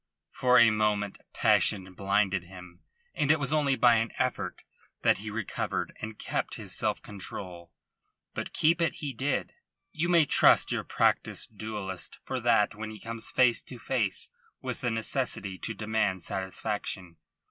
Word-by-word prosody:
For 125 0 +4
a 115 -2 +7
moment 105 -2 0
passion 95 -2 +2
blinded 100 -1 +1
him, 90 -1 -12 0.3
and 145 - 0
it 160 - +3
was 140 +1 -1
only 145 -3 +3
by 120 -2 +5
an 115 +1 0
effort 130 - -2 0.4
that - - +4
he 105 +1 -5
recovered 105 -1 -3
and 110 0 -6
kept - - -2
his - - -5
self - - 0
control. 90 -3 -8 0.6
But - - -4
keep 165 +2 +3
it 165 - +2
he 145 -4 -4
did. 130 +2 -1 0.4
You 170 +1 -1
may 170 -3 +5
trust - - +5
your - - -1
practised 110 - 0
duellist 100 -4 -5
for 130 - -3
that 115 -3 +3
when 110 +1 -6
he 110 -1 -9
comes 115 0 -4
face 125 -2 +4
to 125 - -10
face 115 -6 -1 0.3
with - - -5
the 125 - 0
necessity 115 -4 -1
to 110 - -4
demand 105 -4 0
satisfaction. 95 -2 -3
110 Hz, 160 wpm, -29 LUFS, 100-125 Hz, 0.6 s, a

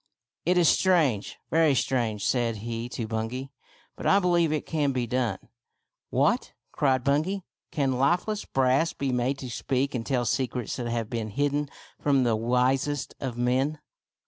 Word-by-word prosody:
" - - -64
It 180 +1 +4
is 175 -2 +5
strange, 155 - +2
very 160 -3 +4
strange," 115 -5 0
said 120 -3 +1
he 115 +1 -4
to 120 -2 -4
Bungay, 115 +5 -3 0.2
" - - -32
but - - -4
I 195 - +6
believe 175 -4 +3
it 155 - -1
can 145 -4 0
be 125 -2 0
done." 125 0 -1 0.4
" - - -52 0.3
What! - - +1
" - - -48
cried 130 -3 +1
Bungay, 160 +9 +1 0.2
" - - -60
can 135 -5 0
lifeless 180 +9 +1
brass 135 +5 +2
be 140 -2 -2
made 125 +2 0
to 130 -2 -7
speak 135 +3 -1
and 120 -3 -2
tell 125 -1 0
secrets 125 0 -1
that 120 -2 -3
have 115 -2 -2
been 115 -2 -2
hidden 145 +5 0 0.3
from 140 -3 +3
the 115 -2 +2
wisest 125 +5 0
of 125 -3 -4
men 130 +5 +1
130 Hz, 180 wpm, -27 LUFS, 120-145 Hz, 0.4 s, I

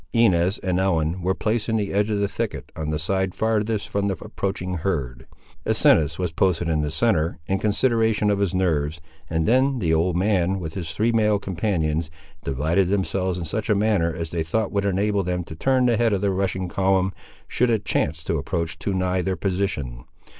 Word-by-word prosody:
Inez 95 -4 +3
and 90 -1 -1
Ellen 85 -2 0
were 95 +2 0
placed 110 0 -1
in 115 - +1
the 105 -3 -1
edge 105 +2 +2
of 105 -1 0
the 100 - +1
thicket 100 - -4
on 80 -1 -3
the 75 - 0
side 95 +4 -1
farthest 110 -1 0
from 100 0 -1
the 95 -3 -1
approaching 95 -2 -3
herd. 65 -8 -3 0.4
Asinus 80 0 +3
was 90 -2 -2
posted 85 0 +1
in 80 -2 +1
the 75 - -1
centre, 80 -2 +1
in 95 +4 0
consideration 110 0 +2
of 100 - 0
his 100 -3 0
nerves, 80 -4 0 0.3
and 80 0 0
then 130 +3 +3
the 85 -8 +1
old 85 +2 +2
man, 95 -1 +1
with 80 -3 -5
his 85 -4 -5
three 110 +8 +1
male 105 -2 +3
companions, 85 -5 -1 0.3
divided 80 +8 +1
themselves 95 -1 0
in 85 - -4
such 110 +8 -3
a 105 - +4
manner 100 -5 +2
as 80 -1 -5
they 85 - -1
thought 100 +7 -1
would 100 -1 0
enable 100 +1 +1
them 90 -1 -2
to 80 -1 -9
turn 130 +8 +2
the 120 -2 +3
head 115 -2 +2
of 95 - 0
the 100 -1 +1
rushing 95 -1 -1
column, 95 +1 +1 0.3
should 125 +1 +1
it 110 -3 0
chance 80 -3 0
to - - -1
approach 85 -1 -3
too 100 - -2
nigh 90 0 0
their 95 +1 -1
position. 85 -12 -2
95 Hz, 205 wpm, -23 LUFS, 85-105 Hz, 0.4 s, a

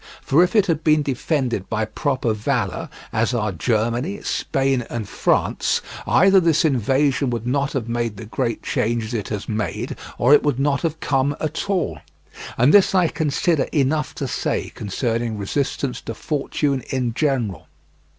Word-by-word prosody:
For 155 +6 +4
if 180 - -1
it 210 -3 +5
had 160 -4 -1
been 155 -1 +4
defended 130 - -1
by 110 0 0
proper 125 0 -1
valour, 110 -2 -2 0.2
as 115 +2 +1
are 105 -3 0
Germany, 120 - -1
Spain, 135 -3 0
and 115 -4 -4
France, - - +1 0.3
either 195 0 +6
this 165 -3 +3
invasion 135 +1 +2
would 120 -2 -3
not 140 +3 0
have 125 -4 -2
made 115 -2 -2
the 115 - -8
great 115 +1 -2
changes 115 0 -1
it 105 -4 -2
has 105 -2 -4
made 105 -6 -3 0.2
or 125 +4 +5
it 150 - +7
would 145 -3 0
not 140 -1 +1
have 160 -1 -2
come 140 +1 +1
at 155 +5 -3
all. 170 - 0 0.6
And 125 +5 +4
this 195 -1 +6
I 180 -3 +4
consider 160 0 +1
enough 150 +1 0
to 140 - -3
say - - -2
concerning 115 +2 -2
resistance 130 +5 -2
to 115 - -6
fortune 140 0 -1
in 125 -3 -1
general. 125 - -1
130 Hz, 160 wpm, -21 LUFS, 115-150 Hz, 0.6 s, it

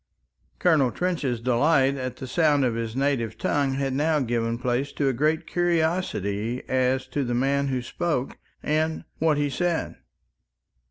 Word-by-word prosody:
Colonel 155 -7 +3
Trench's 150 -6 -1
delight 135 +3 +3
in 130 -2 -4
the 130 - -7
sound 145 0 +2
of 120 - +1
his 115 0 -4
native 130 -5 0
tongue 140 -2 0
had 135 -1 -1
now 150 +3 +2
given 115 -2 -1
place 125 +3 -1
to 140 - 0
a - - 0
great 155 +6 +1
curiosity 160 - -1
as 130 0 +1
to 145 - -1
the 120 -1 -1
man 140 +3 +1
who 130 -2 -1
spoke 135 0 -2 0.2
and 155 +1 0 0.2
what 160 -2 +2
he 145 0 +1
said. 170 +5 -1
135 Hz, 155 wpm, -25 LUFS, 125-155 Hz, 0.2 s, Colonel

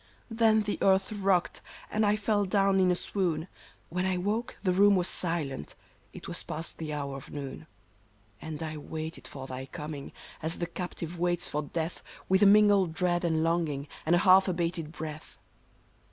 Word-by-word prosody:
Then 220 -1 +4
the 205 0 -2
earth 190 0 +3
rocked, 195 -4 +1 0.3
and 215 - +1
I 205 - +4
fell 210 -1 +1
down 195 0 +3
in 185 -1 +4
a 180 - +3
swoon; 175 -4 -1 0.4
When 180 +2 -1
I 190 -1 +1
woke 210 +6 -2
the 185 -3 +2
room 200 +2 +6
was 180 -1 +1
silent; 160 - -2 0.4
it - - -10
was - - -3
past 160 +2 -5
the 155 -2 -4
hour 140 -2 -3
of 135 - -11
noon; 145 +2 -7 0.4
" 110 -1 -33
And 160 0 -5
I 155 -1 -4
waited 160 +2 -6
for 135 -2 -8
thy 130 0 -6
coming, 150 -1 -7 0.3
as 160 +2 0
the 170 - -1
captive 175 -1 -6
waits 175 0 +1
for 150 - -1
death. 160 +3 -4 0.3
With 190 +1 +3
a 205 - +8
mingled 200 -4 +5
dread 175 0 +1
and 160 -2 +1
longing, 160 -4 0 0.2
and 165 +2 +3
a 175 - +1
half 190 +1 +7
abated 170 -3 -2
breath 155 -2 -7
175 Hz, 180 wpm, -29 LUFS, 155-190 Hz, 0.4 s, a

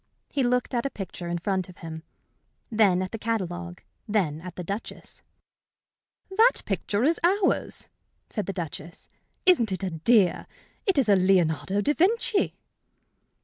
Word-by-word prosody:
He 280 - 0
looked 250 +1 +1
at 240 -1 +1
a 275 - -1
picture 185 -6 -7
in 170 0 -1
front 185 0 -1
of 180 - -13
him, 160 -1 -7 0.7
then 200 -5 +3
at 185 - -5
the 225 - -5
catalogue, 180 -5 -3 0.3
then 180 -8 0
at 180 0 -8
the 180 - -5
Duchess. 200 +6 -6 1.1
"That 455 +4 +4
picture 205 +2 -1
is 320 +5 +3
ours," 375 +2 +1 0.4
said 210 -5 -4
the - - -1
Duchess. 170 -2 -7 0.4
"Isn't 240 - +5
it 190 +1 -2
a 185 - -1
dear? 185 +4 +3 0.4
It's 280 - +3
a 205 - +6
Leonardo 185 0 +2
da 295 - +2
Vinci." 405 +4 +2
195 Hz, 145 wpm, -26 LUFS, 175-245 Hz, 1.1 s, a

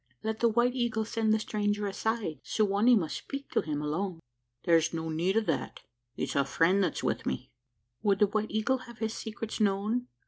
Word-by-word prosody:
"Let 220 0 -2
the 235 - +4
White 240 +2 +2
Eagle 240 -3 0
send 220 0 0
the 220 - +5
stranger 210 -1 -1
aside. 200 - -2
Su 215 - +1
wa 200 0 0
nee 245 +2 +7
must 170 -8 0
speak 275 0 -7
to - - +2
him 150 -1 -3
alone." 170 +4 -2 0.5
"Thar's 165 -1 +3
no 160 0 -3
need 175 +6 +1
o' - - +5
that: 215 - -2 0.3
it's 135 - -3
a 140 - +4
friend 170 +8 +3
that's - - -1
wi' - - 0
me." 65 - -3 0.5
"Would 200 -2 +3
the 210 - +5
White 215 +1 -1
Eagle 220 +5 +1
have 235 -2 -12
his 220 -1 -2
secrets 220 0 -5
known? 215 +4 +1
210 Hz, 205 wpm, -30 LUFS, 175-225 Hz, 0.5 s, nee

